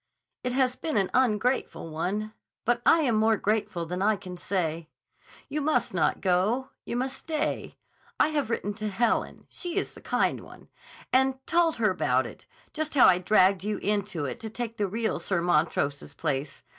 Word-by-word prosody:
It 250 0 -1
has 255 -1 +2
been 315 -2 -2
an 195 -2 +1
ungrateful 250 -7 +1
one. 205 +7 -2 0.3
But 240 0 +2
I 330 - +6
am 255 -6 +2
more 220 0 +3
grateful 200 -5 -1
than 180 +3 -4
I 215 +2 +3
can 185 -2 -8
say. 170 -3 -2 0.6
You 300 - -2
must 305 +2 +1
not - - +1
go. 205 +8 +1 0.2
You - - -4
must 260 +2 -1
stay. 310 +2 -3 0.4
I - - +5
have 295 -6 -1
written 205 -3 -1
to 215 - -1
Helen—she 235 - -1
is - - -1
the - - -13
kind - - +1
one—and 265 0 -3
told 335 -1 +3
her 215 -3 +2
about 130 -8 +1
it; 120 - -11 0.3
just 310 0 -3
how 265 - +8
I 180 - +6
dragged 185 0 +4
you 210 0 -1
into 200 -7 -1
it 185 - -5
to 225 -2 -6
take 230 0 -5
the 205 - 0
real 220 +3 -1
Sir 190 -3 0
Montrose's 150 -4 0
place. 145 -2 -3
215 Hz, 175 wpm, -27 LUFS, 180-255 Hz, 0.6 s, how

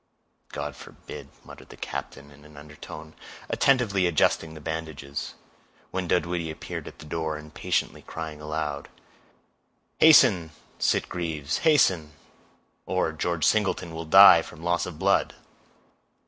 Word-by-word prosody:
"God - - -5
forbid," - - -11 0.2
muttered - - -13
the - - -13
captain, 70 +1 -7
in 70 +1 -18
an 75 -1 -16
undertone, 75 +1 -11 0.4
attentively 110 -9 +2
adjusting 80 -1 +1
the - - -9
bandages, 75 -3 -6 0.6
when 95 -1 -3
Dunwoodie 85 -1 0
appeared 80 - -7
at - - -11
the - - -12
door, 80 0 -3
impatiently 75 0 -3
crying 80 -2 -7
aloud,— 75 -2 -4 1.1
"Hasten, 95 - +6 0.3
Sitgreaves, 80 -5 -1
hasten; 95 - +3 0.7
or 90 -3 0
George 80 +1 -1
Singleton 95 -5 +1
will 80 0 -6
die 80 - +9
from 80 - -12
loss 85 0 0
of 85 -4 -8
blood." - - +1
80 Hz, 120 wpm, -26 LUFS, 75-90 Hz, 1.1 s, die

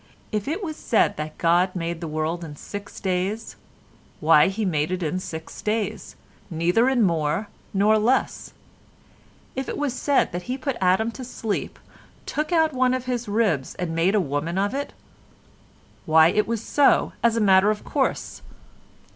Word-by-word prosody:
If 210 0 -2
it 335 +8 -2
was 315 -4 -4
said 225 - +2
that 155 0 -5
God 175 +2 +2
made 170 -1 -3
the 165 - -4
world 155 +3 -2
in 150 -3 -8
six 205 +7 -8
days, 190 +4 -2 0.6
why 150 -1 +5
He 200 +3 -2
did 185 - 0
make 150 0 0
it 185 -1 -2
in 165 +4 -1
six 160 -3 -8
days, 215 -1 -2 0.3
neither 175 +9 +2
in 255 -4 +2
more 170 +3 0 0.2
nor 210 +2 +3
less; 245 +5 0 1.0
if 265 0 -3
it - - -4
was 290 -4 -1
said 280 +1 +1
that 175 0 -4
He 255 - -1
put 270 0 -3
Adam 190 +5 +2
to 255 - -8
sleep, 225 -4 -4 0.5
took 305 +3 -3
out 320 -3 +3
one 255 0 +2
of 255 -1 -4
his 245 -2 -2
ribs 205 -10 0
and 175 -2 -3
made 170 +5 +2
a - - +4
woman 160 +1 -2
of 200 +4 0
it, 285 +1 -3 1.2
why 160 +1 +6
it 210 +4 +1
was 230 -1 -2
so 285 +3 +3
as 230 -1 +3
a - - +2
matter 195 -1 +5
of 215 -1 -2
course. - - -2
200 Hz, 175 wpm, -24 LUFS, 170-235 Hz, 1.2 s, why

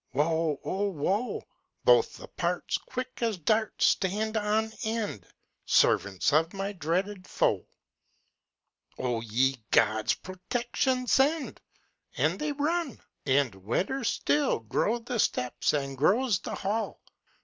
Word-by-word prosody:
Woe, 155 0 +1
oh 200 +2 -1
woe! 195 +8 -1 0.4
Both 485 -2 +4
the - - -10
parts, - - -2
Quick 255 0 -6
as 225 -4 0
darts, 215 +6 +1
Stand 210 +3 +1
on 215 +1 +1
end, 220 - -3 0.4
Servants 100 +7 +3
of 165 +5 +2
my 195 +1 -2
dreaded 185 +3 -2
foe! - - +1 1.3
Oh, 120 -3 -1
ye 125 +4 +1
gods 110 -1 +3
protection 245 +7 -2
send! 280 +4 +2 0.6
And - - +1
they 300 0 -1
run! 295 - -1 0.3
and 135 -4 +3
wetter 120 - -2
still 150 -8 +1
Grow 210 - 0
the 240 0 -4
steps 125 -10 +1
and 140 -2 -1
grows 200 - +3
the - - -5
hail. 210 +3 -2
195 Hz, 120 wpm, -28 LUFS, 145-235 Hz, 1.3 s, Both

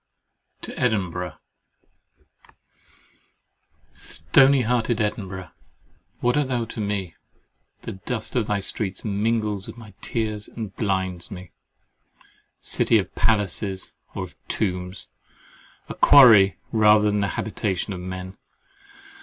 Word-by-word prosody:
TO - - -7
EDINBURGH 95 -7 -1 2.6
—"Stony 135 -1 +3
hearted" 120 -1 0
Edinburgh! 95 -3 -3 0.7
What 120 0 +2
art 145 -2 +2
thou 120 -3 -1
to 115 - -6
me? 100 -4 -2 0.7
The - - -5
dust 110 +6 -5
of 115 -4 +1
thy 105 -2 0
streets 95 0 -3
mingles 105 -1 -1
with - - -9
my 110 -4 -12
tears 110 -2 -2
and 110 -4 -7
blinds 95 -4 -2
me. 90 -2 -9 1.1
City 115 - +2
of 95 -3 -2
palaces, 100 -3 0 0.2
or - - -3
of - - -13
tombs—a 90 -1 -6
quarry, 110 -9 +7
rather 105 -1 +5
than 105 - 0
the 100 - +1
habitation 100 -2 -2
of 90 - -6
men! 95 +1 -7
105 Hz, 110 wpm, -24 LUFS, 95-115 Hz, 2.6 s, quarry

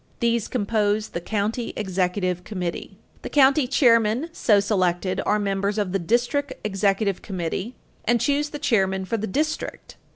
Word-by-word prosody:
These 235 -2 +1
compose 210 -2 0
the 170 - -5
county 220 +5 -2
executive 185 -2 -1
committee. 180 -3 -5 0.2
The - - -6
county 275 -1 +4
chairmen 240 +1 +3
so 210 -10 +3
selected 185 -2 0
are 210 - +3
members 200 0 -1
of 205 -3 -1
the 195 - 0
district 245 - 0
executive 200 -1 0
committee 190 +5 -4 0.3
and 240 0 +2
choose 290 +4 +1
the 295 - -6
chairman 190 -9 +1
for 230 +4 -1
the 220 +1 -3
district. 305 +10 -3
210 Hz, 150 wpm, -24 LUFS, 190-240 Hz, 0.3 s, county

